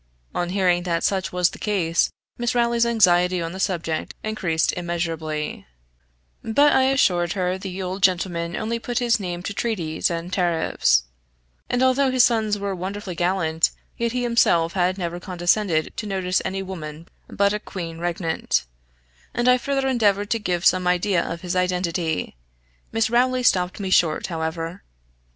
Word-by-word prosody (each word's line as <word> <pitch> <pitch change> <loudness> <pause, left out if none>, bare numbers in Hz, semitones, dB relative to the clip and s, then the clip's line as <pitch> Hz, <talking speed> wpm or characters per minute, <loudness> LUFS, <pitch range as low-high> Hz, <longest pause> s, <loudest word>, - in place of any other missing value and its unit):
On 175 0 -1
hearing 180 -2 +2
that 170 -2 -1
such 190 -2 0
was 180 -1 +2
the - - -11
case, 175 -6 +1 0.3
Miss 240 0 0
Rowley's 235 -1 +2
anxiety 180 -5 +4
on 165 -1 -3
the 190 - -7
subject 165 -4 -2
increased 180 -7 0
immeasurably; 165 - -3 0.8
but 285 +7 +4
I 260 - +4
assured 180 -11 +2
her 185 -2 0
the 190 0 -5
old 185 +2 -4
gentleman 175 -2 +1
only 230 +2 -2
put 240 0 -4
his 240 -2 +2
name 175 -2 -4
to 200 - -4
treaties, 180 -9 -1
and 170 +1 -4
tariffs; 165 - +2 0.7
and 245 +1 +1
although 260 +1 +3
his 255 -1 +5
sons 220 -3 +1
were 200 -1 -3
wonderfully 190 +1 -5
gallant, 170 -2 +1 0.3
yet 235 0 -1
he 250 +1 -1
himself 180 -8 +3
had 185 0 +1
never 175 -2 -3
condescended 175 -1 0
to 215 - -4
notice 185 -2 0
any 195 0 -3
woman 165 -3 -8 0.2
but 200 0 +1
a 210 - -1
queen 165 -5 -7
regnant: 170 - -1 0.7
and 240 +1 +1
I 250 0 +5
further 270 +1 -1
endeavored 205 -5 +1
to 230 - +2
give 180 -4 -2
some 185 -1 +4
idea 180 0 +2
of 170 0 -5
his 180 0 -3
identity. 180 - -1 0.6
Miss 225 0 +1
Rowley 255 +1 +2
stopped 180 -5 +2
me 190 -2 -3
short, 160 -4 +3
however. 165 +1 -4
185 Hz, 160 wpm, -23 LUFS, 170-215 Hz, 0.8 s, his